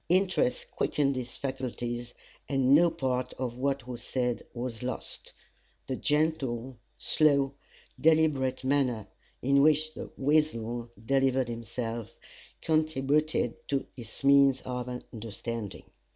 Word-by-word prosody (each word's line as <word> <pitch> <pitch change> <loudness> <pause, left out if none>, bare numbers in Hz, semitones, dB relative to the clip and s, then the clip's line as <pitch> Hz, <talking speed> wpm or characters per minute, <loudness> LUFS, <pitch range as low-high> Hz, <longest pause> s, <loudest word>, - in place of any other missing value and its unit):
Interest 185 -8 +2
quickened 140 -2 +1
his 125 -1 -5
faculties, 120 -2 -4 0.3
and 135 -1 +3
no 170 +4 +7
part 125 -4 -2
of 125 -1 -4
what 135 -1 -1
was 120 -2 -6
said 125 -1 -1
was 120 -2 -5
lost. 125 +1 -5 0.5
The 130 - -2
gentle, 135 -6 0 0.2
slow, 140 -3 +3 0.5
deliberate 150 -5 +3
manner 130 -5 +1 0.4
in 140 +2 +4
which 155 +1 +4
The - - -7
Weasel 120 -5 +1 0.2
delivered 135 -1 +2
himself, 115 -1 -5 0.5
contributed 155 -4 +1
to 140 -1 0
his 115 +1 -10
means 140 -1 +6
of 125 -1 -4 0.2
understanding. 115 -1 -5
130 Hz, 110 wpm, -29 LUFS, 120-145 Hz, 0.5 s, no